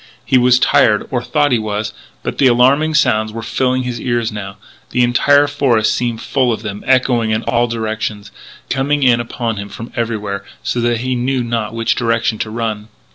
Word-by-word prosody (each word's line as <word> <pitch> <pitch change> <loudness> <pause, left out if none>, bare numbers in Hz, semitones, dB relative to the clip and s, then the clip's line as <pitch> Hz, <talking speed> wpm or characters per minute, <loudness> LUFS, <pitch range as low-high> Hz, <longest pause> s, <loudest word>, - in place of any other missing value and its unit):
He 130 - +4
was 125 0 +5
tired, 105 -4 +3
or 125 -2 0
thought 145 +3 +1
he 120 - +3
was, 105 0 -3 0.3
but - - -4
the 135 - +5
alarming 135 +6 +3
sounds 110 -6 +2
were 115 +1 -6
filling 130 +2 0
his 125 -1 -4
ears 120 -2 -1
now; 100 -2 -7 0.3
the 125 - +2
entire 140 +4 +4
forest 140 -6 +1
seemed 120 -2 -2
full 130 -3 +1
of 110 -1 -3
them, 105 -1 -6
echoing 125 -3 +2
in 110 +1 0
all 120 0 +1
directions, 110 -2 -4 0.4
coming 140 +2 0
in 120 -2 +4
upon 115 -1 -3
him 100 0 -6
from 115 +4 -9
everywhere, 105 -4 -3 0.2
so 120 - -1
that 120 -1 0
he 130 +1 -1
knew 125 +1 -1
not 115 -2 -2
in 115 - -9
which 115 0 +1
direction 115 -2 0
to 110 - -3
run. 110 -2 -3
120 Hz, 195 wpm, -16 LUFS, 110-125 Hz, 0.4 s, was